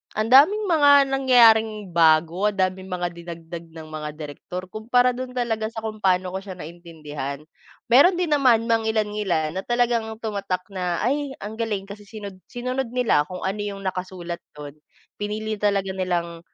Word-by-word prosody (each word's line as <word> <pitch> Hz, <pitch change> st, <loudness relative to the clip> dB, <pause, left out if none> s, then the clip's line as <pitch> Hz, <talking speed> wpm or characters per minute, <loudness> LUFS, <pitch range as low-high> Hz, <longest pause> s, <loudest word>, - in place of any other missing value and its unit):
ang 215 Hz, +2 st, -1 dB
daming 365 Hz, +11 st, +6 dB
mga 295 Hz, -4 st, +5 dB, 0.2 s
nangyaring 225 Hz, -6 st, +4 dB
bago, 165 Hz, +4 st, +3 dB
ang 205 Hz, -, -1 dB
daming 185 Hz, 0 st, -1 dB
mga 180 Hz, -1 st, -2 dB
dinagdag 170 Hz, 0 st, -9 dB
ng 160 Hz, -1 st, -11 dB
mga 150 Hz, -1 st, -5 dB
direktor 155 Hz, +4 st, -7 dB
kumpara 245 Hz, +3 st, +2 dB
do'n 255 Hz, +1 st, -6 dB
talaga 225 Hz, -3 st, -1 dB
sa 225 Hz, 0 st, -7 dB
kung 215 Hz, -1 st, -5 dB
paano 185 Hz, -2 st, +1 dB
ko 190 Hz, -, -3 dB
siya 190 Hz, -2 st, -9 dB
naintindihan. 150 Hz, -4 st, -7 dB, 0.5 s
Mayro'n 315 Hz, +9 st, +7 dB
din 350 Hz, -3 st, -1 dB
naman 255 Hz, -6 st, +4 dB
mangilan-ngilan 210 Hz, -8 st, 0 dB
na -, -, -6 dB
talagang 240 Hz, -2 st, +1 dB, 0.2 s
tumatak 200 Hz, -4 st, -2 dB
na, 180 Hz, 0 st, -2 dB
"Ay, 280 Hz, +2 st, -1 dB
ang 220 Hz, +2 st, -7 dB
galing" 210 Hz, -4 st, -2 dB
kasi 200 Hz, +1 st, -11 dB
sinod 200 Hz, -4 st, -9 dB
sinunod 255 Hz, +1 st, -3 dB
nila 220 Hz, -12 st, +2 dB
kung 180 Hz, 0 st, -7 dB
ano 195 Hz, +2 st, -2 dB
'yong 200 Hz, -1 st, -5 dB
nakasulat 180 Hz, -2 st, -5 dB, 0.2 s
do'n. 145 Hz, 0 st, -9 dB, 0.4 s
Pinili 215 Hz, 0 st, -3 dB
talaga 200 Hz, -2 st, +1 dB
nilang, 175 Hz, -3 st, -2 dB
200 Hz, 160 wpm, -23 LUFS, 175-230 Hz, 0.5 s, Mayro'n